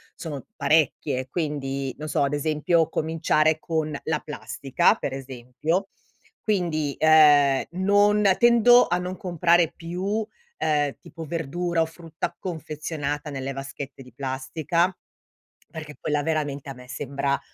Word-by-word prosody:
sono 150 -5 -7
parecchie. 140 -3 +1
Quindi 140 -5 -3
non 155 - -5
so 145 -1 +1
ad 140 +1 0
esempio 155 +2 +1
cominciare 155 -1 +1
con 155 -3 -2
la 155 -2 0
plastica 150 - 0
per 135 - -4
esempio, 135 +8 -3 0.5
quindi, 165 -8 0
uhm, 150 -3 +6
non 205 +3 +3 0.2
tendo 240 +1 +6
a 175 - +1
non 180 +1 -4
comprare 175 -2 +2
più, 175 +2 -6
uhm, 210 - -2
tipo 165 -1 -10
verdura 170 +2 -1
o - - +3
frutta 165 -1 -6
confezionata 150 -3 -4
nelle 135 -1 -4
vaschette 135 0 -7
di 125 - -13
plastica, 140 +8 -1 0.8
perché 155 -2 -8
quella 145 -1 -1
veramente 145 -3 -2
a - - -5
me 125 0 -14
sembra 140 +2 -2
155 Hz, 125 wpm, -25 LUFS, 140-170 Hz, 0.8 s, uhm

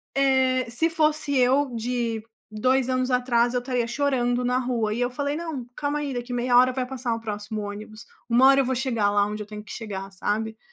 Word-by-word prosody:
eh, 260 -2 +2
se 320 +8 +1
fosse 310 -2 +1
eu 260 +1 +3
de 230 -1 -2 0.3
2 255 +4 +1
anos 255 0 0
atrás, 245 -1 +2
eu 250 - +1
estaria 245 -2 -1
chorando 245 -2 0
na 250 +1 +2
rua. 235 -4 -1
E 240 - -2
eu 245 - +1
falei: 285 +3 -2
“Não. 315 -7 -5
Calma 295 0 -1
aí. 285 -2 -3
Daqui 245 0 -5
meia 245 0 +1
hora 255 +1 +6
vai 255 0 -2
passar 250 -2 -3
o - - -5
próximo 210 -1 -5
ônibus. 215 +2 -8 0.2
Uma 245 +3 +6
hora 275 0 +6
eu - - -1
vou 260 - 0
chegar 235 -5 +1
lá 205 0 +3
onde 210 +1 -4
eu - - -15
tenho 210 0 -8
que 215 - -12
chegar”, 195 -3 -6
sabe? 220 +3 -2
245 Hz, 220 wpm, -25 LUFS, 225-265 Hz, 0.3 s, hora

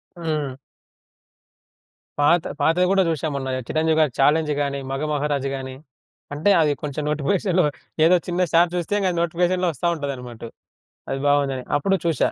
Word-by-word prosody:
హ్మ్. 155 -6 -3 1.6
పాత 160 +4 +4 0.2
పాతవి 165 +5 +3
గూడా 195 -1 +4
చూశా 160 -1 -1
మొన్న. 135 -1 -3 0.2
చిరంజీవి 160 0 +1
గారి 155 -4 +3
'ఛాలెంజ్' 150 +2 +3
గాని, 140 -1 -2
'మగమహారాజు' 145 -1 -1
గాని 130 -1 -6 0.6
అంటే 155 +8 +2
అది 150 -2 +3
కొంచెం 150 0 -3
నోటిఫికేషన్‌లో 180 +4 +1 0.4
ఏదో 180 +2 +6
చిన్న 180 0 -1
షార్ట్ 170 +1 +4
చూస్తే, 175 +3 -2
ఇంగ 190 -2 +1
అది 175 - -4
నోటిఫికేషన్‌లో 175 +2 +1
ఒస్తా 170 +6 -2
ఉంటాదనమాటు. 125 -6 -6 0.6
అది 135 - -2
బావుందని 135 -3 +1
అప్పుడు 195 +7 +1
చూశా. 165 - +1
155 Hz, 140 wpm, -22 LUFS, 140-175 Hz, 1.6 s, ఏదో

